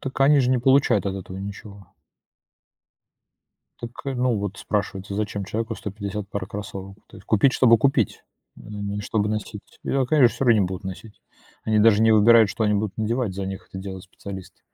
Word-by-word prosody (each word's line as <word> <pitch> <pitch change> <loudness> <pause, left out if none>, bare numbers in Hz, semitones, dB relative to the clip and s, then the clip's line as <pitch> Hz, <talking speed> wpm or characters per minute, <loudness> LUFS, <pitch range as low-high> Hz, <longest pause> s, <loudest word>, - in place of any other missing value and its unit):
Так 135 0 -6
они 140 +1 +6
же 125 -1 +1
не 130 - +3
получают 125 -5 +3
от 95 - -2
этого 95 -1 -7
ничего. 100 0 -9 1.9
Так, 120 - -6 0.2
э, 135 - -2
ну 125 -2 +1
вот 100 -1 -4
спрашивается, 100 -1 -3
зачем 100 -1 -3
человеку 115 +3 -3
150 100 0 -6
пар 100 -2 -4
кроссовок 100 -1 -7
то - - -14
есть? - - -15
Купить, 110 +5 +3
чтобы 115 -3 +5
купить, 135 -4 +1 0.3
н 105 -1 -7
не 100 0 -3
чтобы 105 0 -1
носить? 105 -1 -6
И, - - -3
а, 135 -1 +2
конечно, 130 -3 +4
всё 135 - -2
равно 115 -4 +5
не 95 - +2
будут 95 +1 -6
носить. 100 +2 -9 0.4
Они 110 -1 +1
даже 110 0 +5
не 115 - +5
выбирают, 110 0 +6
что 110 - -2
они 105 0 +2
будут 100 -2 -2
надевать, 110 -2 -1
за 95 -1 -4
них 95 0 -7
это 95 - -8
делают 95 -1 -7
специалисты. 95 0 -10
105 Hz, 195 wpm, -23 LUFS, 100-115 Hz, 1.9 s, они